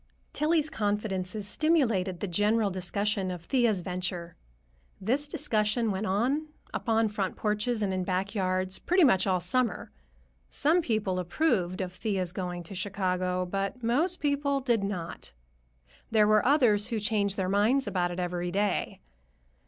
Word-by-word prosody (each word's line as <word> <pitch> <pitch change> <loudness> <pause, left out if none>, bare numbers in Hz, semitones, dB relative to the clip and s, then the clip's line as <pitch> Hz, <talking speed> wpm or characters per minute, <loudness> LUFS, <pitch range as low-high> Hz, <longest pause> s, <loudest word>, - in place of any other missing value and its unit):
Tillie's 310 0 +1
confidences 205 -3 -2
stimulated 220 - +1
the 205 - -1
general 205 +3 +2
discussion 190 +2 -1
of 180 -2 -6
Thea's 235 -6 +2
venture. 180 -1 -4 0.6
This 260 +9 0
discussion 230 -7 +1
went 195 +3 -2
on, 255 +11 0 0.3
upon 225 -1 +1
front 200 -3 -2
porches 210 +2 -1
and 195 -2 0
in 185 -1 -1
back 190 +2 -1
yards, 185 -2 -1
pretty 360 +1 +3
much 195 -9 +4
all 185 -1 +2
summer. 235 +8 0 0.6
Some 320 +5 +2
people 215 - -1
approved 185 - 0
of 180 -1 -4
Thea's 185 -3 -2
going 180 -2 -4
to 170 - -9
Chicago, 185 -1 -1
but 195 +6 -3
most 310 +11 +1
people 285 -1 +1
did 240 -6 +1
not. 175 - -5 0.8
There 215 -1 +4
were 215 0 +4
others 240 -7 +4
who 230 -3 -2
changed 205 -2 0
their 190 -2 0
minds 215 +8 +2
about 175 -2 0
it 175 +1 -5
every 175 0 -2
day. 200 +3 -1
205 Hz, 145 wpm, -28 LUFS, 185-235 Hz, 0.8 s, much